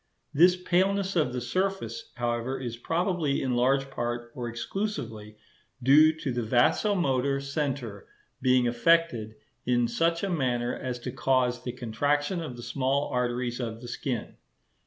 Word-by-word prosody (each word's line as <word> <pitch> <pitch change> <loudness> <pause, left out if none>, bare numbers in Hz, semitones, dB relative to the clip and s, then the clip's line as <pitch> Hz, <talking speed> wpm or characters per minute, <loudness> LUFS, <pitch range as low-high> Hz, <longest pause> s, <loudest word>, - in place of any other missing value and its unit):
This 175 +5 +6
paleness 190 +2 +1
of 150 -7 +2
the 125 - -2
surface, 195 - -2
however, 120 +2 -2
is 120 -3 -4
probably 165 +2 0
in 130 -2 -1
large 135 +2 +2
part, 120 -2 -3
or 120 -2 -4
exclusively, 120 - -4 0.5
due 150 +5 +7
to 135 - -2
the 120 0 -1
vasomotor 135 - +2
centre 140 -7 -3 0.3
being 125 -1 +4
affected 120 -3 +2 0.3
in 120 -1 +2
such 165 +6 0
a 200 - 0
manner 125 -6 0
as 125 -1 -4
to 125 - -4
cause 130 -1 +1
the 125 - -4
contraction 145 - -1
of 150 -7 -6
the 120 - -8
small 135 +2 0
arteries 125 0 -1
of 115 -2 -4
the 120 - -9
skin. 120 0 -4
130 Hz, 145 wpm, -28 LUFS, 120-155 Hz, 0.5 s, due